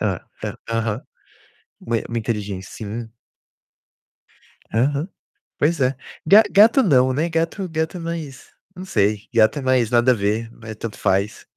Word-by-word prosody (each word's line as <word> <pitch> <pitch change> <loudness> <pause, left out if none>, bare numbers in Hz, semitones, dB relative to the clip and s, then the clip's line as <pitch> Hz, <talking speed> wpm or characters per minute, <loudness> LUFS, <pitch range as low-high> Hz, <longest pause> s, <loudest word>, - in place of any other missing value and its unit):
Hã - - -1 0.2
a - - -4
aham. 115 0 -1 0.8
Mui 115 -1 -2
muito 115 0 -1
inteligên 100 -4 -2
sim. 110 +4 -7 1.6
Aham, 140 - +1 0.5
pois 155 +2 +1
é. 130 +1 +2 0.3
Ga 205 +7 +8
gato 220 +7 +6
não, 130 - +4
né, 155 +6 0
gato 165 +4 -1
gato 160 +2 -2
é - - -7
mais 165 -5 -6 0.2
não 185 +2 -8
sei, 105 - 0
gato 115 +5 +4
é - - -5
mais 130 -3 +2
nada 120 +1 +4
a - - +5
ver, 110 +2 -1
é 110 -1 -6
tanto 110 0 -7
faz. 100 +1 0
125 Hz, 150 wpm, -21 LUFS, 110-160 Hz, 1.6 s, Ga